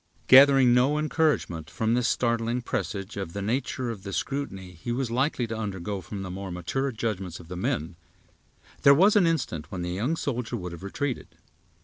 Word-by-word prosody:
Gathering 135 -2 +8
no 130 +5 +3
encouragement 150 - 0
from 110 +1 0
this 125 0 +2
startling 115 0 0
presage 100 -3 -4
of 95 -4 -5
the 100 - -4
nature 125 +2 -1
of 105 -4 -8
the 100 0 -7
scrutiny 95 -11 -3
he 90 +7 -6
was 125 -1 -1
likely 130 0 0
to 115 0 -5
undergo 100 -2 -4
from 95 +3 -6
the 95 - -6
more 95 +1 -6
mature 90 +11 -2
judgments 100 -7 -3
of 85 -1 -13
the 90 - -5
men, 85 -1 -2 0.8
there 140 0 +7
was 195 +8 +5
an 190 -5 +5
instant 115 - -2
when 90 -3 -4
the 90 - -3
young 115 - -1
soldier 125 -6 -3
would 90 -4 -6
have 85 - -9
retreated. 125 +7 -4
115 Hz, 190 wpm, -27 LUFS, 95-130 Hz, 0.8 s, Gathering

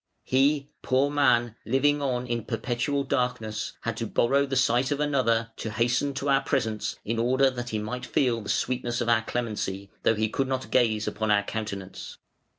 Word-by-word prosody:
He, 140 +2 +2
poor 135 +2 +2
man, 125 -6 +3
living 145 +4 +2
on 125 -3 -1
in 120 -3 -3
perpetual 125 +4 -1
darkness, 125 -5 -2
had 115 -1 -2
to 115 - -2
borrow 140 +6 +2
the 135 - -2
sight 125 0 +3
of 145 - -1
another 115 -6 +1
to 110 - -4
hasten 120 +5 0
to 140 +1 -3
our 135 0 +4
presence 110 -6 -1
in 115 +2 -1
order 130 +3 +3
that 120 -1 -5
he 110 - -2
might 110 +4 -4
feel 120 -4 +1
the 100 - -8
sweetness 120 -1 -1
of 120 - 0
our 115 -1 +4
clemency, 105 -5 -3
though 115 - +3
he 110 +1 +1
could 135 +5 -1
not 130 0 -3
gaze 110 -4 +2
upon 110 0 -2
our 105 -1 +4
countenance. 100 -3 -6
120 Hz, 185 wpm, -27 LUFS, 110-135 Hz, -, our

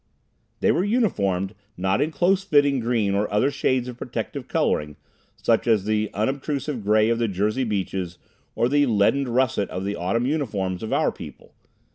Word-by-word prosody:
They - - +4
were 180 - +1
uniformed, 100 - 0 0.2
not 95 +2 +1
in 150 - +1
close 180 +5 +2
fitting 145 -7 +3
green 115 -4 0
or 100 +1 0
other 105 +7 +2
shades 130 -2 0
of 125 -1 -8
protective - - -5
coloring, 75 0 0 0.4
such 115 +1 +1
as 110 -4 +3
the 110 0 0
unobtrusive 135 +2 -2
gray 110 +2 +3
of 115 0 +1
the 115 - +1
Jersey 105 +6 0
Beaches 95 -4 -3 0.4
or 120 - +2
the 145 +2 +3
leadened 120 +5 +2
russet 120 -5 +1
of 95 +1 -4
the 100 +1 -2
autumn 95 +8 -1
uniforms 105 - -2
of 110 - -5
our - - +2
people. - - -12
115 Hz, 170 wpm, -24 LUFS, 100-135 Hz, 0.4 s, They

